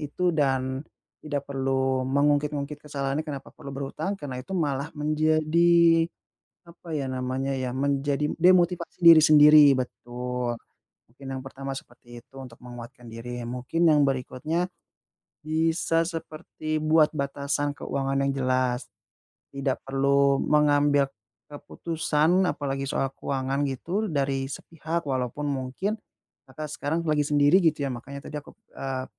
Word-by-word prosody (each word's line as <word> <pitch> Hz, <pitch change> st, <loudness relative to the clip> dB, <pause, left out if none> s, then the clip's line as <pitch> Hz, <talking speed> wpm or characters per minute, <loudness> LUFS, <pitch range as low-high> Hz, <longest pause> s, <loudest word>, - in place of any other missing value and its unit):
itu 175 Hz, +4 st, -1 dB
dan 130 Hz, -3 st, 0 dB, 0.4 s
tidak 145 Hz, -2 st, -3 dB
perlu 135 Hz, -1 st, 0 dB
mengungkit-ngungkit 145 Hz, +1 st, 0 dB
kesalahannya 140 Hz, 0 st, -3 dB
kenapa 140 Hz, -3 st, -7 dB
perlu 140 Hz, -, -9 dB
berhutang. 140 Hz, +8 st, -3 dB
Karena, 130 Hz, -3 st, -5 dB
itu 130 Hz, -, -10 dB
malah 145 Hz, -3 st, -1 dB
menjadi, 160 Hz, +2 st, +3 dB, 0.6 s
apa 170 Hz, -1 st, -9 dB
ya 140 Hz, -2 st, -2 dB
namanya 130 Hz, +1 st, -2 dB
ya, 130 Hz, -1 st, -3 dB
menjadi 140 Hz, +1 st, 0 dB
demotivasi 175 Hz, 0 st, +3 dB
diri 165 Hz, -1 st, +10 dB
sendiri 150 Hz, 0 st, +8 dB
betul. 125 Hz, -1 st, -4 dB, 0.6 s
Mungkin 135 Hz, +2 st, -12 dB
yang -, -, -6 dB
pertama 135 Hz, +1 st, -6 dB
seperti 120 Hz, -3 st, -13 dB
itu, 135 Hz, -, -24 dB
untuk 125 Hz, -3 st, -11 dB
menguatkan 120 Hz, 0 st, -11 dB
diri. 120 Hz, +2 st, -7 dB
Mungkin 125 Hz, +8 st, 0 dB
yang 150 Hz, -2 st, +5 dB
berikutnya, 135 Hz, +6 st, -2 dB, 0.8 s
bisa 165 Hz, +1 st, +1 dB
seperti 155 Hz, -2 st, -5 dB
buat 155 Hz, 0 st, +4 dB
batasan 140 Hz, 0 st, -2 dB
keuangan 135 Hz, -1 st, -2 dB
yang 140 Hz, -, +1 dB
jelas. 130 Hz, -1 st, 0 dB, 0.7 s
Tidak 135 Hz, -1 st, -2 dB
perlu 140 Hz, 0 st, +2 dB
mengambil 145 Hz, -2 st, +3 dB, 0.4 s
keputusan, 165 Hz, +4 st, 0 dB
apalagi 135 Hz, -1 st, -3 dB
soal 135 Hz, 0 st, -1 dB
keuangan 135 Hz, 0 st, -2 dB
gitu 180 Hz, -, -2 dB
dari 135 Hz, -3 st, -1 dB
sepihak, 165 Hz, +3 st, -5 dB
walaupun 130 Hz, 0 st, -2 dB
mungkin, 140 Hz, +11 st, -3 dB, 0.5 s
Kakak, 150 Hz, +3 st, -7 dB
sekarang 155 Hz, +4 st, -2 dB
lagi 150 Hz, -1 st, +2 dB
sendiri 145 Hz, +4 st, +5 dB
gitu 160 Hz, -5 st, +1 dB
ya -, -, -2 dB
makanya 140 Hz, +3 st, -8 dB
tadi 150 Hz, -, -4 dB
akup 140 Hz, -, -17 dB, 0.2 s
eee, 130 Hz, -1 st, -4 dB
140 Hz, 125 wpm, -26 LUFS, 135-155 Hz, 0.8 s, diri